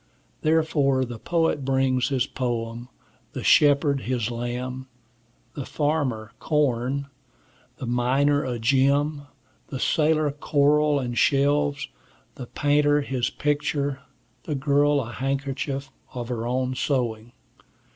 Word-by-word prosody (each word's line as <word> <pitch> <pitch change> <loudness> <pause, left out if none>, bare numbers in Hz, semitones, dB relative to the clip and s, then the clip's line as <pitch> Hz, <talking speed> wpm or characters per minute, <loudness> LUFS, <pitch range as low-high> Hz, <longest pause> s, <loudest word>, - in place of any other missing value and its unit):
Therefore 150 -4 +2
the 120 -2 -8
poet 165 -2 0
brings 130 -1 +1
his 130 -3 +1
poem; 120 -1 -4 0.4
the - - -5
shepherd, 145 -1 +4
his 120 -2 -2
lamb; 125 +2 -4 0.7
the 140 - -5
farmer, 135 -8 -1
corn; 140 -2 0 0.7
the - - -6
miner, 135 +4 +2
a 125 -2 -3
gem; 140 +4 +1 0.4
the 135 - -6
sailor, 155 +1 +2
coral 150 0 +2
and 120 -2 -3
shells; 145 0 +2 0.5
the 125 - -8
painter, 145 +2 +2
his 130 -3 -1
picture; 145 -1 -1 0.5
the 150 - -2
girl, 145 +1 +2
a 120 -1 -7
handkerchief 135 +1 -3 0.2
of 120 -1 -5
her 120 -1 -3
own 130 +1 -1
sewing. 120 -4 -2
135 Hz, 115 wpm, -24 LUFS, 125-145 Hz, 0.7 s, shepherd